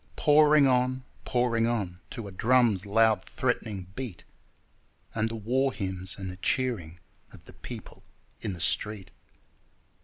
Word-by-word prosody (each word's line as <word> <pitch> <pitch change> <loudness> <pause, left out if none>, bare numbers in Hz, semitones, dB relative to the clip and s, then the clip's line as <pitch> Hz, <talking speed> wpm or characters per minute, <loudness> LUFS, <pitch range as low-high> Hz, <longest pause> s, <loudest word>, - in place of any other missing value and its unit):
Pouring 150 -1 +6
on, 130 0 +2 0.2
pouring 120 -2 +1
on, 100 -7 -2
To 115 -5 -6
a - - -8
drum's 110 -1 +3
loud 110 -1 +3
threatening 110 -6 -2
beat, 120 -7 -6 0.9
And 110 0 0
the 115 - -5
war 130 +5 +1
hymns 95 -3 -4
and 95 -2 -5
the 90 - -10
cheering 95 -7 -1 0.3
of - - -15
the - - -13
people - - -10 0.4
in 105 -4 -3
the 85 - -8
street. 105 +2 0
115 Hz, 140 wpm, -28 LUFS, 95-125 Hz, 0.9 s, Pouring